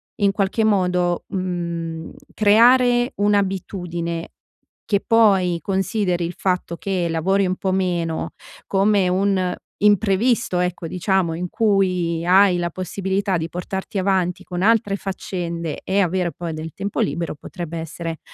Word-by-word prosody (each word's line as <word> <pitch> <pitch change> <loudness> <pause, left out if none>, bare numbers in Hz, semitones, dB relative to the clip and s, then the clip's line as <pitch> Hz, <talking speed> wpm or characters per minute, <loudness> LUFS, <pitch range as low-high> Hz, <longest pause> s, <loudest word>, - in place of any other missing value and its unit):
in 200 -1 +2
qualche 200 +2 0
modo, 180 -4 +1
mhmm, 170 -3 -4 0.2
creare 240 +3 +4
un'abitudine 185 -4 -1 0.6
che 200 - +4
poi 195 -6 +3
consideri 190 -2 0
il 170 - -4
fatto 180 -2 -1
che 185 -2 -1
lavori 190 +5 +1
un 185 0 0
po' 190 0 -2
meno 175 -4 -1 0.4
come 195 -1 +3
un 185 -1 +1 0.3
imprevisto 210 0 +2
ecco, 180 -1 -2
diciamo, 180 -1 0
in 175 +2 -4
cui 180 -6 +1
hai 185 0 +5
la 175 0 -1
possibilità 190 +2 -1
di 160 - -3
portarti 190 +3 -5
avanti 185 -2 0
con 180 -1 -5
altre 205 -1 +3
faccende 170 -4 -4
e 195 +1 +1
avere 180 -2 0
poi 170 +2 -5
del 155 0 -6
tempo 200 +1 -4
libero, 165 +3 -1
potrebbe 170 +2 -7
essere, 165 0 -5
185 Hz, 130 wpm, -21 LUFS, 170-200 Hz, 0.6 s, hai